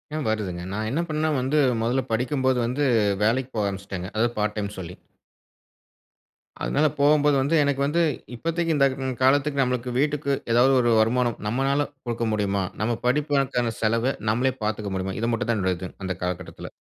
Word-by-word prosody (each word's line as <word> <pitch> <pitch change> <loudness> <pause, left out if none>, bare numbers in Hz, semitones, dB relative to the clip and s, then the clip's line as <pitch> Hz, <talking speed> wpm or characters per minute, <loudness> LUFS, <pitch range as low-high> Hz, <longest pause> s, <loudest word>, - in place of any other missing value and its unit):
ஏன் 155 - -2
வருதுங்க. 100 -5 -2
நான் 110 +1 -2
என்ன 145 +7 -1
பண்ணனா 155 0 0
வந்து 135 +4 0 0.2
முதல்ல 125 +3 +1
படிக்கும்போது 130 +2 +1
வந்து 130 +5 -1 0.4
வேலைக்கு 125 +4 +1
போக 105 -2 +1
ஆரம்பிச்சிட்டேங்க, 95 -1 -5
அதாவது 120 +2 0
பார்ட் 105 0 0
டைம் 100 -1 -2
சொல்லி. 90 0 -7 1.7
அதனால 155 +2 +2
போகும்போது 145 0 +4
வந்து 150 +5 +1
எனக்கு 140 -1 0
வந்து 165 +4 +1 0.3
இப்பதைக்கு 165 +4 -1
இந்த 140 -1 +4 0.2
ம் 130 -1 -2
காலத்துக்கு 140 +1 +3
நம்மளுக்கு 125 -1 -1
வீட்டுக்கு 145 -1 0 0.2
ஏதாவது 130 +3 +5
ஒரு 120 -1 +2
வருமானம் 120 +1 +2
நம்மளால 135 +5 +1 0.2
குடுக்க 120 0 -2
முடியுமா? 100 -2 0 0.2
நம்ம 115 +1 0
படிப்புக்கான 135 -3 +1
செலவ 115 +4 +1 0.2
நம்மளே 130 +3 +1
பார்த்துக்க 105 -2 -2
முடியுமா? 95 0 -3
இது 115 - 0
மட்டும் 120 0 -2
தான் 115 - +2
என்னுடைய 95 -2 0
இது 95 - -6
அந்த 95 -2 -2
காலகட்டத்தில. 90 -2 -5
125 Hz, 165 wpm, -24 LUFS, 105-140 Hz, 1.7 s, ஏதாவது